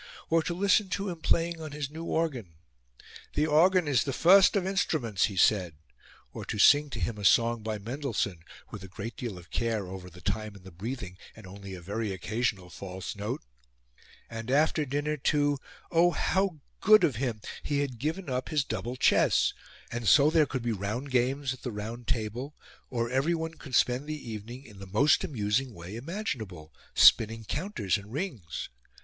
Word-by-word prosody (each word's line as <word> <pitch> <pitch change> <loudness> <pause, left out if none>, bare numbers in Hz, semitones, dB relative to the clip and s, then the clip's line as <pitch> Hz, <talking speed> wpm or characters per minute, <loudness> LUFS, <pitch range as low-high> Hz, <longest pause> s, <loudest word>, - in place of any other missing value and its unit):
Or 165 0 +4
to 170 +2 -3
listen 200 +1 +3
to 200 +2 -2
him 170 -3 -6
playing 165 0 +1
on 155 -2 -7
his 145 -2 -4
new 160 +2 -7
organ 130 - -2 0.8
'The 150 - +3
organ 170 +3 +4
is 135 -5 +3
the 140 - -2
first 185 +9 +6
of 195 -2 +1
instruments,' 155 - +1
he 100 - -4
said; 90 -4 +3 0.6
or - - -6
to - - -4
sing 145 +7 +6
to 120 - -5
him 105 +3 -2
a - - -6
song 115 +3 +4
by 110 0 -3
Mendelssohn, 115 - -3 0.3
with 105 -4 -8
a - - -8
great 110 +4 -7
deal 115 -7 -5
of 85 -2 -14
care 115 -4 -1
over 90 0 -8
the 90 +1 -14
time 105 +2 -3
and 95 - -14
the 95 - -11
breathing, 100 0 -6 0.2
and 110 - -13
only 100 0 -9
a 90 - -10
very 105 +4 -3
occasional 95 -1 -2
false 95 +2 -6
note! 105 +1 -4 0.8
And, 115 0 -7
after 150 +3 +2
dinner, 145 +3 -1
to 145 0 +1 0.3
oh, 170 +1 +5
how 185 -2 0 0.2
good 215 -1 +6
of 145 -10 +2
him! 120 -4 -2 0.2
He 145 -1 0
had 130 -5 -4
given 160 +8 -3
up 130 -1 -2
his 150 -4 +1
double 115 +1 -4
chess! 130 - +3 0.4
And 120 -1 -3
so 145 +6 +6
there 160 -2 +4
could 130 -3 -3
be 120 - 0
round 110 +7 -3
games 130 +2 +1
at 130 - -13
the 125 - -4
round 110 +3 -6
table, 125 +4 -3 0.3
or 115 -1 -2
everyone 160 +5 0
could 140 -5 -6
spend 125 +4 +2
the 150 -6 -5
evening 115 +5 -8
in 105 -5 -14
the 100 - -9
most 110 +11 +3
amusing 115 0 -1
way 85 +4 -8
imaginable 115 - -5 0.2
spinning 115 0 +6
counters 145 - -1
and 100 +1 -13
rings.' 125 - -4
125 Hz, 185 wpm, -29 LUFS, 105-150 Hz, 0.8 s, first